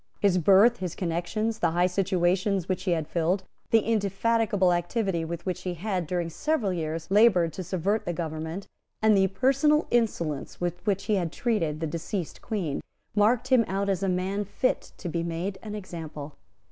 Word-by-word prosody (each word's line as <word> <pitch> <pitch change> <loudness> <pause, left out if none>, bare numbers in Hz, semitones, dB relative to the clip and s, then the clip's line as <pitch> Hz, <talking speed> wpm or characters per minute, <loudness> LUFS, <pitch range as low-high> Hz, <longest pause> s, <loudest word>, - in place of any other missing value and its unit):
His 190 -3 +3
birth, 200 +7 +6
his 180 -5 -4
connections, 190 +6 -2
the - - +2
high 175 +2 +2
situations 185 0 +1
which 185 0 -2
he 185 - +1
had 160 -3 -2
filled, 175 +3 0 0.3
the 225 - +5
indefatigable 210 -2 +1
activity 175 0 -1
with 170 +1 -5
which 185 -2 -2
he 180 -1 -3
had, 185 -1 -2
during 175 0 -1
several 265 - 0
years, 160 0 -4
laboured 195 -6 +5
to 185 - -5
subvert 190 +4 -1
the - - -1
government, 160 +2 -4 0.3
and 220 -1 +4
the 190 -1 +4
personal 275 - +3
insolence 170 -11 -1
with 175 0 -3
which 195 -1 +1
he 210 - +1
had 170 -4 -1
treated 165 -11 -1
the - - 0
deceased 170 +3 -4
Queen, 180 -10 -2 0.3
marked 225 +4 +3
him 255 -3 +5
out 200 +1 -1
as 190 -2 0
a 195 - +1
man 190 +3 -1
fit 230 +5 -1
to 180 - -6
be 170 0 -1
made 170 +3 -3
an 210 -1 -6
example. 160 -7 -7
185 Hz, 180 wpm, -27 LUFS, 170-210 Hz, 0.3 s, birth